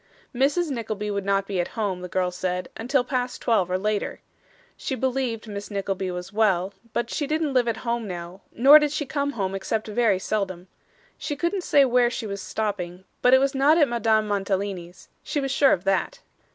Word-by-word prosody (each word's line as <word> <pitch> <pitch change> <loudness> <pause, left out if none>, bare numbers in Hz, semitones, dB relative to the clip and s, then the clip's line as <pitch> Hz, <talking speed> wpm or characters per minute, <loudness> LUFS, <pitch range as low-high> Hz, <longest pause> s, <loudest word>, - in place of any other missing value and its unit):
Mrs. 285 +6 +1
Nickleby 215 -4 -3
would 200 -1 -2
not 195 0 +1
be 195 -2 -3
at 175 - 0
home, 195 -5 -1
the 180 - -5
girl 180 0 0
said, 180 0 -3
until 245 +3 +1
past 250 -1 -2
twelve, 215 -7 +1
or 185 - +1
later. 210 +1 -2 0.6
She 265 - -3
believed 255 -4 -2
Miss 205 -1 -6
Nickleby 195 -2 -2
was 180 +3 -6
well, 195 -3 +2 0.2
but 235 +1 -2
she 290 - -2
didn't 305 -1 0
live 250 -2 +3
at 230 -1 0
home 235 -2 -1
now, 175 +1 -7
nor 275 +6 +8
did 300 -1 0
she 300 0 -2
come 285 +1 -2
home 195 -5 -2
except 215 +3 -2
very 215 -2 +2
seldom. 185 -2 -3 0.5
She 290 - -3
couldn't 350 +4 -1
say 285 -4 +5
where 245 -1 +3
she 240 -1 -4
was 200 -2 -5
stopping, 190 -4 -3 0.2
but 250 +1 +6
it - - +6
was 275 0 +1
not 280 +4 +4
at 300 -4 +5
Madame 225 -3 +1
Mantalini's. 195 -3 -3
She 295 - -2
was 270 -1 -2
sure 275 0 +4
of 175 - +1
that. 195 - 0
220 Hz, 200 wpm, -25 LUFS, 195-265 Hz, 0.6 s, nor